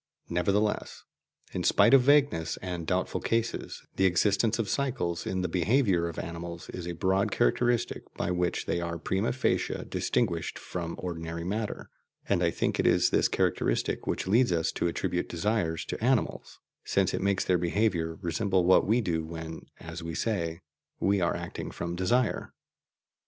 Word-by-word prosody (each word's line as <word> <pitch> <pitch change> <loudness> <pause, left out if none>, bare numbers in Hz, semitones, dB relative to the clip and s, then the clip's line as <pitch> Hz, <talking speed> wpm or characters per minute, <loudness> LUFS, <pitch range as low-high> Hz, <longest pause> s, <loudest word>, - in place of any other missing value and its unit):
Nevertheless, 100 +5 0 0.5
in - - -2
spite - - +5
of 135 - +8
vagueness 140 - +3
and 90 -3 -4
doubtful 95 0 0
cases, 115 0 -2
the 95 - +5
existence 100 +5 +2
of 115 -3 -1
cycles 115 -9 -1
in 95 -1 -1
the - - +1
behaviour 90 - +2
of 85 - -7
animals 85 0 -6
is 90 -1 -6
a 85 - -3
broad 95 +4 +1
characteristic 120 0 +1
by - - -1
which 90 -1 -1
they 85 - -1
are 85 0 -3
prima 95 +6 0
facie 130 - -1
distinguished 85 -8 -1
from 85 -2 -5
ordinary 85 -2 -5
matter; 105 +4 -3 0.4
and - - +2
I - - +3
think - - -1
it - - +3
is - - +4
this - - +3
characteristic - - 0
which - - -1
leads 115 +3 +3
us 85 -1 +1
to - - -1
attribute 90 +1 -2
desires 85 -2 -1
to - - -5
animals, 125 -1 0 0.3
since 95 -2 +1
it - - -1
makes 100 0 +1
their 90 -1 +2
behaviour 85 -2 0
resemble 90 +2 +1
what 95 +1 +5
we 115 +4 +3
do 85 -6 -1
when 80 0 -7
(as 85 +1 -7
we 85 0 -5
say) 85 -6 -2 0.4
we 100 0 +2
are 85 - +1
acting - - -5
from 85 0 -4
desire. 115 +7 0
90 Hz, 165 wpm, -29 LUFS, 85-105 Hz, 0.5 s, of